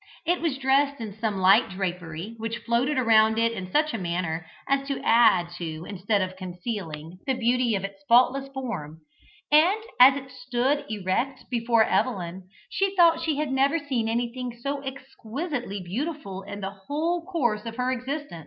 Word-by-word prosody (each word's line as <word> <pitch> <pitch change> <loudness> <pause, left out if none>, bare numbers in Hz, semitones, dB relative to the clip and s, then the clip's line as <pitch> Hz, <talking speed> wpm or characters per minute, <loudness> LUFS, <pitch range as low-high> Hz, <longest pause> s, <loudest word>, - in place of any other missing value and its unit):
It 350 +2 +1
was 320 -5 0
dressed 275 +1 +2
in 220 -3 -6
some 215 -3 -1
light 190 +1 +5
drapery, 180 0 -4
which 225 +1 -3
floated 250 +5 +1
around 220 -3 +4
it 230 0 +3
in 185 -5 -6
such 305 0 +2
a 225 - -2
manner 170 -2 -2 0.2
as 275 0 +1
to 275 - -2
add 220 -7 +5
to 160 -1 -5
instead 200 +1 0
of 185 0 -5
concealing, 180 -3 -6
the 265 - +2
beauty 245 -1 +2
of 195 - -2
its 195 0 -7
faultless 255 +3 +4
form, 180 - -6 0.5
and, 335 +8 +5 0.2
as 260 +2 +9
it 270 -2 -7
stood 260 +3 -1
erect 215 +6 -2
before 230 -1 +3
Evelyn, 185 -6 -1 0.2
she 390 0 -1
thought 335 -2 +5
she 315 -2 0
had 300 -2 -1
never 275 +4 +3
seen 265 -7 -2
anything 240 +1 -3
so 275 +3 -3
exquisitely 265 - -5
beautiful 205 - -4
in 200 +1 -8
the 195 0 -3
whole 305 - -2
course 240 - -1
of 230 - -5
her 250 +1 0
existence. 260 - -4
235 Hz, 170 wpm, -26 LUFS, 195-275 Hz, 0.5 s, as